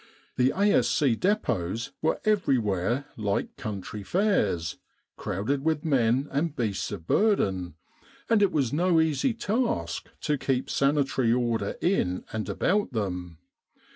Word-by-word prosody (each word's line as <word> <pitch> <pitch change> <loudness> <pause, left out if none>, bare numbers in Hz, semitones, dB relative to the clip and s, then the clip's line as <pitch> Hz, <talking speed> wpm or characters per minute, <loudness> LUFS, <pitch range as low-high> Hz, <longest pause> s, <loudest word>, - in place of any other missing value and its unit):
The 125 +1 +3
A.S.C. 185 - +3
dep6ts 115 - -1
were 160 - +1
everywhere 125 - +1
like 105 -2 -2
country 105 0 -6
fairs, 100 - 0 0.4
crowded 135 +9 -2
with 160 0 0
men 130 -2 +2
and 150 +2 -1
beasts 110 -7 -2
of 80 - -6
burden; 95 - +1 0.5
and 225 -2 +3
it 200 -2 +4
was 140 -7 0
no 170 +1 +3
easy 160 - +1
task 220 - -1
to 150 -2 0
keep 130 -1 -1
sanitary 140 -4 +2
order 115 -4 0
in 90 - 0
and 110 -1 -3
about 200 -6 0
them. 90 -6 -3
130 Hz, 125 wpm, -27 LUFS, 105-170 Hz, 0.5 s, it